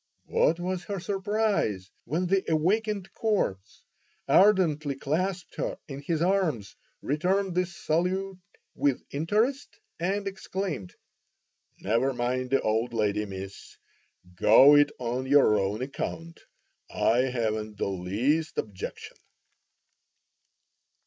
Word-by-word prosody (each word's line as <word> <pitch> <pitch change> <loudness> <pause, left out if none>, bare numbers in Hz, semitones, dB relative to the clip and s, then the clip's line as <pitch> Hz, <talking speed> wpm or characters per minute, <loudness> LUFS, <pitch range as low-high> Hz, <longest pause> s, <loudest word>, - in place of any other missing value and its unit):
What 165 +2 +2
was 180 0 -3
her 200 -2 -4
surprise 195 - -1
when 170 +5 -1
the 190 +1 +2
awakened 195 +4 0
"corpse" 145 - -2 0.4
ardently 165 -8 +4
clasped 175 +5 -2
her - - -2
in 140 -1 -7
his 160 +2 -1
arms, 170 - 0 0.3
returned 185 +6 0
the 180 0 +1
salute 180 +3 -2 0.3
with 140 -3 0
interest, 215 - -1 0.2
and 195 +4 -1
exclaimed: 190 - -4 0.9
"Never 120 +6 +1
mind 125 +1 -1
the 135 - +2
old 110 +3 0
lady, 105 -1 0
Miss; 95 0 -9 0.6
go 130 +10 +7
it 145 0 +5
on 125 +2 -3
your 135 -6 +5
own 100 +5 -1
account; 165 +4 -5 0.5
I 115 - +2
haven't 110 -4 -2
the - - -1
least 120 - -1
objection." 100 -4 -6
150 Hz, 110 wpm, -27 LUFS, 115-190 Hz, 0.9 s, go